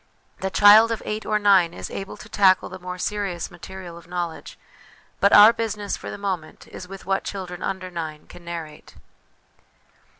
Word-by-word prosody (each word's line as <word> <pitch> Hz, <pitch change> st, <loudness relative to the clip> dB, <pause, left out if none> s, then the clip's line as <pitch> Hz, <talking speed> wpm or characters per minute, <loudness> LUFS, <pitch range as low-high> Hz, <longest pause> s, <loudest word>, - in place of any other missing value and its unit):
The 190 Hz, -, -2 dB
child 210 Hz, +4 st, +7 dB
of 225 Hz, -, -3 dB
eight 215 Hz, +1 st, -4 dB
or 215 Hz, -, +2 dB
nine 195 Hz, -5 st, +4 dB
is -, -, -7 dB
able 195 Hz, -, -6 dB
to -, -, -12 dB
tackle 190 Hz, -2 st, +3 dB
the 185 Hz, -, -9 dB
more 180 Hz, 0 st, -7 dB
serious 195 Hz, -2 st, -3 dB
material 175 Hz, -1 st, -10 dB
of 170 Hz, -, -19 dB
knowledge; 175 Hz, -2 st, -5 dB, 0.6 s
but 200 Hz, -, +4 dB
our 210 Hz, +2 st, +9 dB
business 210 Hz, -3 st, -3 dB
for -, -, -8 dB
the -, -, -6 dB
moment 190 Hz, -6 st, -5 dB
is 180 Hz, -, -9 dB
with 195 Hz, 0 st, -10 dB
what 195 Hz, +1 st, 0 dB
children 180 Hz, -3 st, -6 dB
under 185 Hz, -1 st, -4 dB
nine 160 Hz, -3 st, -6 dB
can 175 Hz, -, -14 dB
narrate. 165 Hz, -3 st, -8 dB
190 Hz, 175 wpm, -23 LUFS, 175-205 Hz, 0.6 s, our